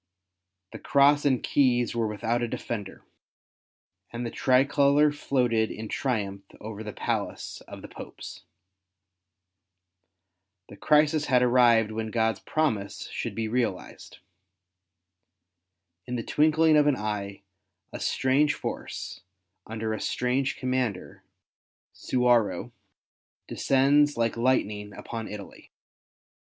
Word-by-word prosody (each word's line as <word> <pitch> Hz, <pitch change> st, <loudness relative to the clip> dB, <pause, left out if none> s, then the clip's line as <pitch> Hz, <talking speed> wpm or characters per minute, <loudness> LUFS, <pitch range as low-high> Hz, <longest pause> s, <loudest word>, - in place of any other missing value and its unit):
The -, -, -9 dB
Cross 145 Hz, +1 st, +3 dB
and 130 Hz, -3 st, +2 dB
Keys 125 Hz, -4 st, +2 dB
were 115 Hz, -1 st, 0 dB
without 110 Hz, +3 st, -1 dB
a 120 Hz, -, 0 dB
defender, 105 Hz, -3 st, -6 dB, 1.1 s
and 120 Hz, +1 st, -5 dB
the 115 Hz, -, -4 dB
tricolour 140 Hz, +3 st, +3 dB
floated 125 Hz, -6 st, 0 dB
in 110 Hz, 0 st, -7 dB
triumph 100 Hz, -7 st, -2 dB, 0.2 s
over 110 Hz, 0 st, -7 dB
the 105 Hz, -, -6 dB
palace -, -, -4 dB
of -, -, -10 dB
the -, -, -7 dB
Popes. -, -, -10 dB, 2.3 s
The -, -, -11 dB
crisis 150 Hz, +6 st, +3 dB
had 125 Hz, -3 st, +3 dB
arrived 120 Hz, -3 st, +4 dB
when 110 Hz, 0 st, -4 dB
God's 110 Hz, 0 st, 0 dB
promise 110 Hz, -11 st, -2 dB
should -, -, -5 dB
be 115 Hz, -1 st, -2 dB
realized. 115 Hz, -5 st, -3 dB, 1.9 s
In 125 Hz, -, -3 dB
the 115 Hz, -, -3 dB
twinkling 155 Hz, +3 st, +3 dB
of 150 Hz, -1 st, +4 dB
an 145 Hz, -, +3 dB
eye, 105 Hz, -3 st, -4 dB, 0.5 s
a -, -, -5 dB
strange 140 Hz, +3 st, +1 dB
force, -, -, -6 dB, 0.5 s
under 110 Hz, 0 st, -3 dB
a 110 Hz, -, -4 dB
strange 130 Hz, +2 st, -1 dB
commander, 130 Hz, -7 st, -3 dB, 0.7 s
Suwarrow, 120 Hz, -7 st, +1 dB, 0.8 s
descends 145 Hz, +2 st, +3 dB
like 115 Hz, -1 st, 0 dB
lightning 105 Hz, -4 st, 0 dB
upon 115 Hz, -2 st, -6 dB
Italy. 105 Hz, -1 st, -10 dB
120 Hz, 110 wpm, -27 LUFS, 110-140 Hz, 2.3 s, arrived